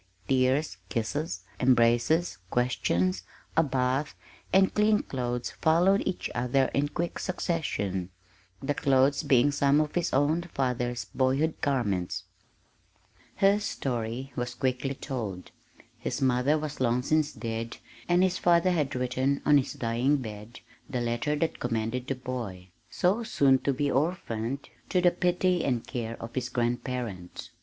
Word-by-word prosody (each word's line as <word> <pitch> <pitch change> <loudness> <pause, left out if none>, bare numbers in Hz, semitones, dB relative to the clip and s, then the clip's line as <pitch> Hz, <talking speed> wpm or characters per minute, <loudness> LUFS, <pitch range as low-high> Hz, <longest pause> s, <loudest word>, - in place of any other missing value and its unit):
Tears, 130 -3 +2
kisses, 115 - -2 0.2
embraces, 125 - +3
questions, 95 -7 +1 0.3
a 165 - +6
bath, 135 0 0 0.4
and 190 0 +4
clean 210 0 +3
clothes 125 -2 -3
followed 180 +5 +3
each 190 - -2
other 125 +2 +1
in 145 +1 +2
quick 170 +3 -3
succession 105 - -2 0.5
the 145 - 0
clothes 135 0 +3
being 135 +2 +4
some 140 0 +3
of 155 -1 0
his 175 -2 0
own 145 +5 +2
father's 125 -2 -1
boyhood 135 +5 0
garments. 95 -9 0 1.1
His 200 +1 +3
story 120 +1 -3
was 120 0 -3
quickly 130 +2 -1
told. 110 -11 -5 0.5
His - - -3
mother 130 +3 +2
was 150 -1 -5
long 125 0 +1
since 155 +1 +2
dead, 115 0 -5 0.3
and 175 +1 +4
his 185 -1 +1
father 175 +1 +4
had 150 -5 0
written 130 +2 0
on 145 -1 +6
his 130 - -3
dying 120 +5 +1
bed 110 -2 -8 0.3
the 130 -3 -2
letter 120 +5 0
that 160 +2 -1
commended 120 +2 -2
the 135 - -1
boy 115 -8 -6 0.2
so 195 +6 +1
soon 135 - +3
to 140 - 0
be 140 +1 0
orphaned 135 -4 -1 0.2
to 180 - +2
the 180 0 +5
pity 180 0 +1
and 125 -4 0
care 115 -2 -4
of 115 0 -7
his 125 -1 -2
grandparents. 120 -6 -3
130 Hz, 140 wpm, -28 LUFS, 120-150 Hz, 1.1 s, a